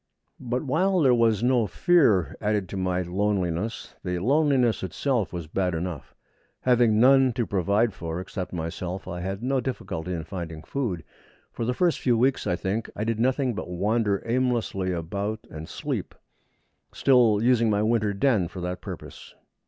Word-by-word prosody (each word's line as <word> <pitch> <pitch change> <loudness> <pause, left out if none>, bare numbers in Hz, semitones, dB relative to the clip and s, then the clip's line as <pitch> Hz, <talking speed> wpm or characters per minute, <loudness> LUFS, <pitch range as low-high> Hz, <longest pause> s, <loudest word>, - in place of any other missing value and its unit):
But 125 +1 -2
while 180 +7 +2
there 135 -6 +5
was 115 -3 +2
no 120 -3 +3
fear 105 - +3
added 105 -3 0
to - - -6
my 90 -1 0
loneliness, 90 - -2
the 90 0 -2
loneliness 130 - +2
itself 110 - -1
was 85 -3 -5
bad 90 +2 -1
enough. 80 -5 -5 0.5
Having 120 -4 +3
none 130 +1 +5
to 120 -1 -1
provide 100 +4 +1
for 85 -2 -5
except 90 0 -5
myself, 90 +2 -5
I 90 - -5
had 95 +4 -4
no 135 +1 +1
difficulty 95 -9 -4
in 85 -2 -3
finding 80 -2 -7
food. 95 - -3 0.5
For 115 - -4
the 125 +2 -1
first 175 +1 +2
few 120 -3 +2
weeks, 130 +3 +1
I 90 - +1
think, 100 +5 -3
I 105 - -2
did 115 0 -1
nothing 130 +1 +1
but 100 - -6
wander 100 +3 0
aimlessly 115 -6 0
about 100 +6 -3
and 80 +1 -8
sleep, - - -4 0.8
still 120 -6 +4
using 120 -2 +3
my 105 0 +2
winter 110 -2 +2
den 100 -3 +2
for 90 - -9
that 90 +1 -4
purpose. - - -9
105 Hz, 165 wpm, -26 LUFS, 90-125 Hz, 0.8 s, there